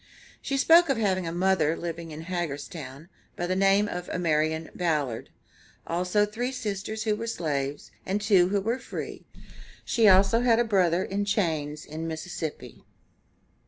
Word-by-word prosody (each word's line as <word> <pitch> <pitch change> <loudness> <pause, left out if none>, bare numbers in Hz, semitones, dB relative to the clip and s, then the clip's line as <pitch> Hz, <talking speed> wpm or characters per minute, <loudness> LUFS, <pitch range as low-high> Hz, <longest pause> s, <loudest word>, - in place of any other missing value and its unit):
She 275 - -2
spoke 330 +4 +6
of 270 - +2
having 190 -5 0
a - - -2
mother 175 -3 +2
living 170 -1 -5
in 155 0 -7
Hagerstown, 155 -4 -5 0.3
by 175 - -2
the 185 +1 -1
name 195 +2 +4
of 180 -2 -5
Amarian 160 -2 0
Ballad, 150 -9 -1 0.6
also 180 +4 +1
three 235 +5 -3
sisters 215 -3 -4
who 215 -2 +1
were 230 +2 -5
slaves, 145 -8 -3
and 195 +2 -1
two 195 -4 +4
who 200 0 +1
were 230 +6 -1
free; - - -7 0.6
she 225 -2 +3
also 195 +3 +6
had 240 -2 +4
a 240 - +3
brother 185 -5 +2
in 200 +1 -2
chains 160 -8 -1
in 160 +2 -5
Mississippi. 160 -1 -6
180 Hz, 155 wpm, -27 LUFS, 160-210 Hz, 0.6 s, spoke